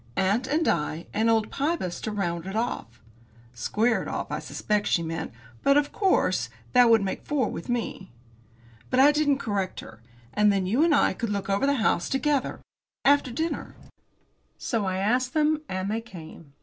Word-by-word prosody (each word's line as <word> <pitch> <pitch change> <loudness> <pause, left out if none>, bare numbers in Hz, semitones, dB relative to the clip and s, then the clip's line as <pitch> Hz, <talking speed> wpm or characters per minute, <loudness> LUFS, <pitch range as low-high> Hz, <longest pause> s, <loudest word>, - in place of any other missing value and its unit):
Aunt 205 +7 +1
and 310 +4 +1
I, 155 +1 -1
and 225 +2 +2
old 225 -1 +2
Pybus 280 - -2
to 215 - -3
round 175 -4 -2
it 195 - -5
off." 220 - -3 0.5
Square 220 - +1
it - - -6
off, - - -4
I - - -2
suspect 210 -1 -1
she 170 - +2
meant, 160 0 -4 0.3
because, 275 +1 +5
of 290 0 +1
course, 385 -3 +1 0.2
that 245 -2 +6
would 225 -3 +5
make 190 - -3
four 275 -7 0
with 170 - -7
me. 230 -5 -3 0.8
But 255 - +1
I 280 +2 +7
didn't 295 -2 +2
correct 200 -7 -2
her. 110 0 -13 0.3
"And 210 0 +4
then 195 -2 0
you 235 +11 +2
and 330 -3 +4
I - - +3
could 230 - -3
look 200 -1 -2
over 200 +8 +1
the 280 - +3
house 220 -8 +1
together 280 0 0 0.4
after 285 -1 +4
dinner." 320 +7 -3 0.8
So 225 -4 -2
I 185 0 -1
asked 250 +7 0
them. 305 0 +2
And 185 +2 -2
they 225 +1 -1
came. 165 -8 -12
220 Hz, 185 wpm, -26 LUFS, 190-275 Hz, 0.8 s, I